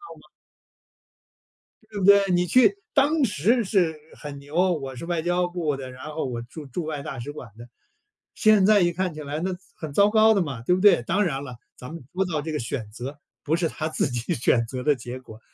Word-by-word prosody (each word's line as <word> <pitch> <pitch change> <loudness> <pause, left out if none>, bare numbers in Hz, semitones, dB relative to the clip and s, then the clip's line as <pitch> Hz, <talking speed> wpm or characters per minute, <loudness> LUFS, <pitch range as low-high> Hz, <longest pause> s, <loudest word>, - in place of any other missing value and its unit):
吗？ - - -20 1.6
对 210 -2 -6
不 185 - 0
对？ 200 0 +7
你 175 0 +2
去 210 0 +4 0.2
当 290 +2 +3
时 220 - +2
是 185 -5 +1 0.2
很 145 -2 -8
牛， 145 +2 -12 0.2
“我 135 -5 -5
是 125 - -7
外 170 -2 -1
交 175 +1 0
部 170 -5 -2
的， 130 -1 -7
然 125 0 -11
后 155 0 -3
我 120 -3 -4
驻 140 +6 -10
驻 140 +6 -5
外 150 -2 -4
大 135 - -6
使 130 +5 -6
馆 125 -6 -10
的”， 120 +1 -11 0.7
现 215 -3 +5
在 210 -1 +5
一 175 - +3
看 180 -1 -2
起 155 - -8
来 145 +1 -4
那 185 +1 -1
糟 180 - -9 0.2
很 155 -3 -7
糟 200 +6 +5
糕 220 +1 +5
的 200 - +2
嘛， 140 -8 -4
对 180 - +3
不 185 - -2
对？ 205 - +6
当 190 +9 +1
然 140 -7 -2
了， 125 -4 -9 0.2
咱 125 +5 -9
们 165 - -8
说 190 +1 0
到 160 -5 -2
这 160 +2 -5
个 150 - -2
选 115 -2 -4
择， 130 +6 -7 0.2
不 155 - +1
是 170 -1 0
他 155 - -4
自 - - 0
己 120 -2 -2
选 115 0 +2
择 125 +2 -6
的 150 +2 +3
结 125 +1 -7
果， 110 -4 -13
155 Hz, 245 characters per minute, -24 LUFS, 135-185 Hz, 1.6 s, 对